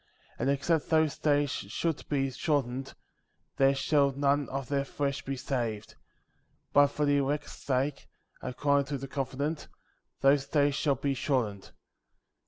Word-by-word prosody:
20. -, -, -7 dB
And 140 Hz, -, +2 dB
except 155 Hz, +2 st, 0 dB
those 160 Hz, -2 st, +3 dB
days 145 Hz, -2 st, +2 dB
should 165 Hz, 0 st, -3 dB
be 135 Hz, -2 st, 0 dB
shortened, 135 Hz, -2 st, -1 dB, 0.6 s
there 135 Hz, 0 st, +4 dB
should 140 Hz, 0 st, +2 dB
none 140 Hz, 0 st, +2 dB
of 135 Hz, -1 st, -4 dB
their 140 Hz, 0 st, 0 dB
flesh 140 Hz, 0 st, -2 dB
be 135 Hz, -, -3 dB
saved; 120 Hz, -5 st, -3 dB, 0.8 s
but 145 Hz, 0 st, +7 dB
for 145 Hz, +1 st, -1 dB
the 145 Hz, 0 st, +3 dB
elect's 145 Hz, +2 st, -1 dB
sake, 135 Hz, +1 st, -2 dB, 0.3 s
according 140 Hz, +2 st, +1 dB
to 140 Hz, 0 st, -2 dB
the 135 Hz, +1 st, -6 dB
covenant, 140 Hz, +3 st, -3 dB, 0.5 s
those 140 Hz, 0 st, +4 dB
days 145 Hz, -2 st, +2 dB
shall 140 Hz, 0 st, +1 dB
be 140 Hz, +1 st, -1 dB
shortened. 120 Hz, -7 st, -1 dB
140 Hz, 145 wpm, -29 LUFS, 135-145 Hz, 0.8 s, but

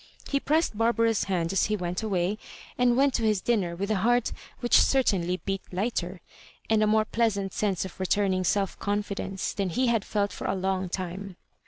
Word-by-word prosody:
He 280 Hz, -, +1 dB
pressed 310 Hz, -3 st, +1 dB
Barbara's 230 Hz, 0 st, +2 dB
hand 180 Hz, -2 st, -1 dB
as 195 Hz, -, +3 dB
he 215 Hz, -, 0 dB
went 180 Hz, 0 st, -3 dB
away, 200 Hz, -1 st, -1 dB, 0.4 s
and 245 Hz, -1 st, +3 dB
went 275 Hz, 0 st, +4 dB
to -, -, 0 dB
his 215 Hz, -3 st, +2 dB
dinner 185 Hz, -5 st, 0 dB
with 200 Hz, +4 st, -2 dB
a 215 Hz, -, +2 dB
heart 240 Hz, +4 st, +2 dB, 0.3 s
which 240 Hz, -, +5 dB
certainly 185 Hz, -9 st, +2 dB
beat 195 Hz, -1 st, -1 dB
lighter, 185 Hz, -2 st, -2 dB, 0.5 s
and 220 Hz, -1 st, +4 dB
a 215 Hz, -, +3 dB
more 215 Hz, 0 st, +3 dB
{feasant 210 Hz, -4 st, 0 dB
sense 195 Hz, -4 st, 0 dB
of 190 Hz, -, -10 dB
returning 190 Hz, 0 st, +1 dB
self 195 Hz, +1 st, 0 dB
confidence, 200 Hz, -2 st, -2 dB
than 195 Hz, -2 st, -1 dB
he 255 Hz, +10 st, +1 dB
had 225 Hz, -3 st, +1 dB
felt 205 Hz, -1 st, -1 dB
for -, -, -5 dB
a -, -, 0 dB
long 190 Hz, -1 st, -1 dB
time. 185 Hz, +1 st, -5 dB
200 Hz, 190 wpm, -27 LUFS, 185-225 Hz, 0.5 s, which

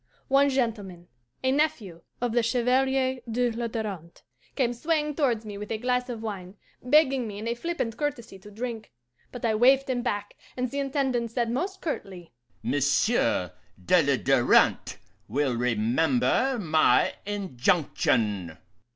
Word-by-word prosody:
One 275 Hz, +1 st, +4 dB
gentleman, 210 Hz, -9 st, -3 dB, 0.3 s
a 260 Hz, -, +2 dB
nephew 265 Hz, -, -1 dB, 0.2 s
of 245 Hz, -1 st, 0 dB
the 240 Hz, +1 st, +2 dB
Chevalier 260 Hz, +2 st, +1 dB
de 240 Hz, +1 st, +1 dB
la 235 Hz, +1 st, -3 dB
Darante, 205 Hz, -7 st, -6 dB, 0.3 s
came 245 Hz, -4 st, +1 dB
swaying 300 Hz, +3 st, -1 dB
towards 245 Hz, -7 st, 0 dB
me 205 Hz, -1 st, -7 dB
with 210 Hz, -, -7 dB
a 220 Hz, -, -1 dB
glass 250 Hz, +2 st, -1 dB
of 230 Hz, -2 st, -6 dB
wine, 195 Hz, -3 st, -6 dB, 0.3 s
begging 270 Hz, -2 st, +3 dB
me 205 Hz, -1 st, -7 dB
in 215 Hz, +2 st, -5 dB
a 235 Hz, -, 0 dB
flippant 240 Hz, -4 st, -3 dB
courtesy 240 Hz, -9 st, -4 dB
to 205 Hz, -, -13 dB
drink; 225 Hz, +1 st, -6 dB, 0.4 s
but 245 Hz, -1 st, -5 dB
I 225 Hz, -, +2 dB
waved 260 Hz, +5 st, +4 dB
him 255 Hz, -2 st, -1 dB
back, 205 Hz, -4 st, -3 dB, 0.2 s
and 250 Hz, -1 st, -2 dB
the 280 Hz, -, -3 dB
Intendant 265 Hz, -4 st, -1 dB
said 235 Hz, 0 st, -1 dB
most 375 Hz, +10 st, -3 dB
curtly, 190 Hz, -, -6 dB, 0.3 s
'Monsieur 145 Hz, -, +1 dB, 0.3 s
de 180 Hz, -, +5 dB
la 140 Hz, -2 st, +2 dB
Darante 130 Hz, -1 st, +3 dB, 0.3 s
will 135 Hz, +1 st, 0 dB
remember 125 Hz, -, +1 dB
my 160 Hz, -5 st, +3 dB
injunction. 125 Hz, -, 0 dB
230 Hz, 145 wpm, -26 LUFS, 185-260 Hz, 0.4 s, de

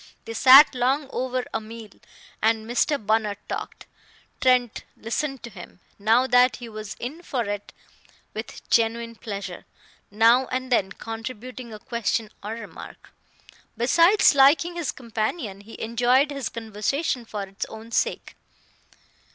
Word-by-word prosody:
They 225 Hz, -, -6 dB
sat 265 Hz, +6 st, +8 dB
long 265 Hz, +3 st, 0 dB
over 255 Hz, 0 st, -2 dB
a 225 Hz, -, -1 dB
meal, 220 Hz, -1 st, -10 dB, 0.5 s
and 220 Hz, 0 st, +2 dB
Mr. 245 Hz, +5 st, +1 dB
Bunner 215 Hz, -1 st, +1 dB
talked. -, -, -6 dB, 0.6 s
Trent 250 Hz, -3 st, +2 dB
listened 270 Hz, +4 st, -3 dB
to 235 Hz, -, -8 dB
him, 180 Hz, -2 st, -12 dB, 0.2 s
now 225 Hz, +5 st, +3 dB
that 250 Hz, -2 st, +4 dB
he 245 Hz, -, -9 dB
was 215 Hz, -2 st, -7 dB
in 285 Hz, +8 st, -6 dB
for 260 Hz, -8 st, -2 dB
it, 205 Hz, -1 st, -5 dB, 0.6 s
with -, -, -8 dB
genuine 230 Hz, 0 st, +1 dB
pleasure, 200 Hz, -5 st, -7 dB, 0.5 s
now 230 Hz, +5 st, +4 dB
and 255 Hz, 0 st, -4 dB
then 195 Hz, -5 st, +2 dB
contributing 235 Hz, +3 st, -7 dB
a 215 Hz, -, -7 dB
question 225 Hz, 0 st, -2 dB
or 210 Hz, +2 st, -4 dB
remark. 230 Hz, -, -10 dB, 0.7 s
Besides 335 Hz, -, +5 dB
liking 285 Hz, +5 st, +5 dB
his 340 Hz, -5 st, -2 dB
companion, 220 Hz, -, -4 dB
he 220 Hz, +3 st, -12 dB
enjoyed 245 Hz, +5 st, +2 dB
his 275 Hz, -4 st, -3 dB
conversation 230 Hz, +5 st, -2 dB
for 210 Hz, -3 st, -5 dB
its 195 Hz, +2 st, -5 dB
own 220 Hz, +1 st, -11 dB
sake. -, -, -1 dB
235 Hz, 135 wpm, -24 LUFS, 220-255 Hz, 0.7 s, sat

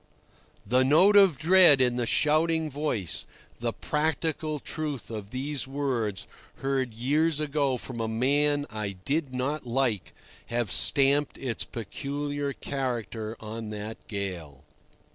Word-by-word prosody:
The 125 Hz, +5 st, +3 dB
note 170 Hz, +10 st, +5 dB
of 195 Hz, -8 st, +6 dB
dread 165 Hz, -1 st, +7 dB
in 125 Hz, -1 st, +3 dB
the 120 Hz, -1 st, -1 dB
shouting 155 Hz, +2 st, +2 dB
voice, 135 Hz, -, -2 dB, 0.3 s
the 120 Hz, 0 st, -1 dB
practical 155 Hz, +2 st, -1 dB
truth 150 Hz, -5 st, -4 dB
of 105 Hz, -3 st, -6 dB
these 135 Hz, +3 st, -3 dB
words, 130 Hz, -8 st, -2 dB, 0.3 s
heard 135 Hz, -4 st, -2 dB
years 150 Hz, +6 st, +1 dB
ago 140 Hz, -3 st, 0 dB
from 120 Hz, 0 st, -7 dB
a 110 Hz, -, -1 dB
man 145 Hz, +5 st, +1 dB
I 105 Hz, -2 st, -4 dB
did 135 Hz, -, -2 dB
not 130 Hz, +2 st, -3 dB
like, 120 Hz, -5 st, -1 dB, 0.3 s
have 120 Hz, -4 st, -1 dB
stamped 140 Hz, +4 st, +3 dB
its 125 Hz, -4 st, -2 dB
peculiar 140 Hz, +6 st, -4 dB
character 120 Hz, -5 st, -4 dB
on 110 Hz, 0 st, -6 dB
that 105 Hz, +1 st, -6 dB
gale. 90 Hz, -, -5 dB
135 Hz, 125 wpm, -27 LUFS, 115-150 Hz, 0.3 s, dread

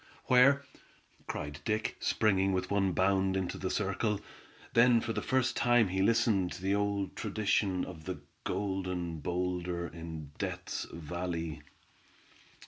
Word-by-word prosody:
"Where?" 135 Hz, +3 st, +6 dB, 0.6 s
cried 75 Hz, -1 st, -4 dB
Dick, 110 Hz, +4 st, -1 dB
springing 95 Hz, -2 st, +2 dB
with 95 Hz, 0 st, -1 dB
one 100 Hz, -2 st, +2 dB
bound 95 Hz, +1 st, +2 dB
into 95 Hz, -2 st, -2 dB
the 95 Hz, -, -2 dB
circle. 105 Hz, +1 st, 0 dB, 0.5 s
Then 120 Hz, 0 st, +6 dB
for 115 Hz, 0 st, -3 dB
the -, -, -2 dB
first 130 Hz, -1 st, +1 dB
time 120 Hz, -4 st, +4 dB
he 95 Hz, +1 st, 0 dB
listened 105 Hz, -4 st, +3 dB
to -, -, -9 dB
the 95 Hz, +1 st, +2 dB
old 100 Hz, -1 st, 0 dB
tradition 100 Hz, -3 st, 0 dB
of 80 Hz, -3 st, -10 dB
the 90 Hz, -5 st, -4 dB, 0.2 s
Golden 90 Hz, -4 st, -2 dB
Boulder 90 Hz, +1 st, -2 dB
in 80 Hz, -2 st, -8 dB
Death's -, -, -3 dB
Valley. 85 Hz, -1 st, -4 dB
95 Hz, 135 wpm, -32 LUFS, 90-105 Hz, 0.6 s, Where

